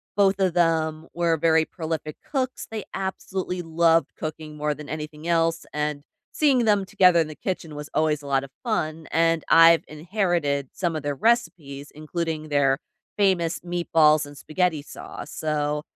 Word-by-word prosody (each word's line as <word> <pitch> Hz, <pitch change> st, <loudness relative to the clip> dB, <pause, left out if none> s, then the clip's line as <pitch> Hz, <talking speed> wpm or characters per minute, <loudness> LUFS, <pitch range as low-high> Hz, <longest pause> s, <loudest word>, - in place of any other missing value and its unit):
Both 200 Hz, -1 st, +3 dB
of 190 Hz, -3 st, +2 dB
them 160 Hz, -2 st, +1 dB
were 170 Hz, -1 st, +2 dB
very 160 Hz, 0 st, +3 dB
prolific 160 Hz, -3 st, -5 dB
cooks, 260 Hz, -2 st, -2 dB
they 220 Hz, -2 st, -5 dB
absolutely 190 Hz, -1 st, -4 dB
loved 165 Hz, -2 st, +2 dB
cooking 155 Hz, -1 st, -6 dB
more 150 Hz, 0 st, -1 dB
than 150 Hz, 0 st, -10 dB
anything 155 Hz, +1 st, -6 dB
else 165 Hz, 0 st, +1 dB
and 150 Hz, -1 st, -2 dB, 0.3 s
seeing 270 Hz, -6 st, +3 dB
them 205 Hz, -3 st, +3 dB
together 180 Hz, -2 st, +4 dB
in 160 Hz, -, +1 dB
the 155 Hz, -, -9 dB
kitchen 175 Hz, -4 st, -4 dB
was 150 Hz, 0 st, -7 dB
always 155 Hz, -1 st, +1 dB
a 145 Hz, -, -10 dB
lot 135 Hz, -1 st, +1 dB
of 135 Hz, -, -10 dB
fun 160 Hz, -9 st, -2 dB
and 165 Hz, 0 st, +2 dB
I've 165 Hz, 0 st, +7 dB
inherited 155 Hz, -4 st, -1 dB
some 175 Hz, -3 st, -2 dB
of 155 Hz, -, -3 dB
their 145 Hz, -1 st, -2 dB
recipes 150 Hz, -, -1 dB
including 155 Hz, 0 st, -4 dB
their 140 Hz, -2 st, +3 dB, 0.4 s
famous 175 Hz, -5 st, +2 dB
meatballs 165 Hz, -3 st, +3 dB
and 145 Hz, 0 st, -12 dB
spaghetti 160 Hz, 0 st, 0 dB
sauce, -, -, -9 dB
so 150 Hz, -1 st, -1 dB
160 Hz, 160 wpm, -24 LUFS, 150-175 Hz, 0.4 s, I've